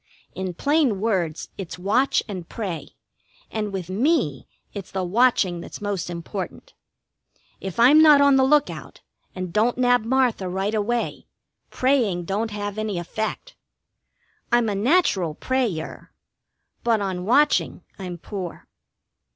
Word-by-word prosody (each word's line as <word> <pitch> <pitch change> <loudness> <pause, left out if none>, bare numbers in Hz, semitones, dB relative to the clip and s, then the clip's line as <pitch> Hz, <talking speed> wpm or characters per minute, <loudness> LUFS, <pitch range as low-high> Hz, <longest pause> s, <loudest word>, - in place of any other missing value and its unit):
In 185 -2 -4
plain 285 - +2
words, 185 -7 -1
its 185 -3 -6
watch 210 +9 +2
and 185 -5 -7
pray, 190 -8 -5 0.6
and 210 -2 -2
with 190 -4 -4
me 205 - 0 0.3
it's 200 -3 -7
the 190 -1 -3
watching 185 -3 +2
that's - - -9
most 200 -4 -3
important. 185 - -6 0.9
If 190 +2 -6
I'm 275 +7 +7
not 300 -2 +8
on 280 -1 +5
the 265 - +4
lookout, 295 +2 0 0.3
and 185 -2 -5
don't 225 +5 +2
nab 245 -2 +3
Martha 240 -6 +1
right 195 +3 -2
away, 225 +3 -2 0.4
praying 235 -10 +1
don't 210 +5 -1
have 205 0 -4
any 215 -3 -2
effect. 215 +6 -4 1.0
I'm 240 -2 +3
a - - -1
natural 200 - +2
pray 260 +1 0
er, 160 - -9 0.7
but 230 -2 +2
on 190 -3 -3
watching 285 +9 +2 0.2
I'm 180 -2 -6
poor. 185 0 -7
210 Hz, 135 wpm, -23 LUFS, 185-245 Hz, 1.0 s, not